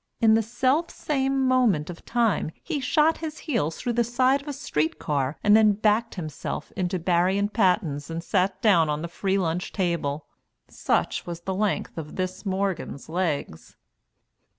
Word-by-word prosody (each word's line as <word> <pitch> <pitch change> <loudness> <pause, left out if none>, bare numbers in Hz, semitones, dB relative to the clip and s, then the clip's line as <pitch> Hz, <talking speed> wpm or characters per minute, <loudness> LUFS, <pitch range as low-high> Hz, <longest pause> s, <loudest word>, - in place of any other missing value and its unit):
In 225 -1 +5
the 225 - +4
self 260 +8 +1
same 270 -2 0
moment 225 -12 +2
of 170 - -12
time, 230 -8 +1
he 315 -4 -2
shot 305 +4 +2
his 315 -1 -5
heels 210 - -2
through 240 - -2
the 235 +1 +2
side 255 +4 +2
of 285 - -17
a - - -2
street 160 - -1
car, 140 -1 -1
and 210 0 +6
then 215 -1 +6
backed 215 +3 +1
himself 155 -3 -5
into 185 -1 -1
Barry 180 +2 +2
and 205 +1 -1
Patten's 180 -8 +1
and 165 +1 -4
sat 185 +1 0
down 170 -8 +5
on 150 +1 -2
the - - -2
free 190 +3 -1
lunch 180 -1 -1
table. 165 -6 -1 0.4
Such - - -1
was 170 -1 -5
the 190 +2 -3
length 200 -3 -1
of 150 -1 -8
this 185 +2 -4
Morgan's 190 -7 -2
legs. 160 - -3
195 Hz, 175 wpm, -25 LUFS, 170-235 Hz, 0.4 s, and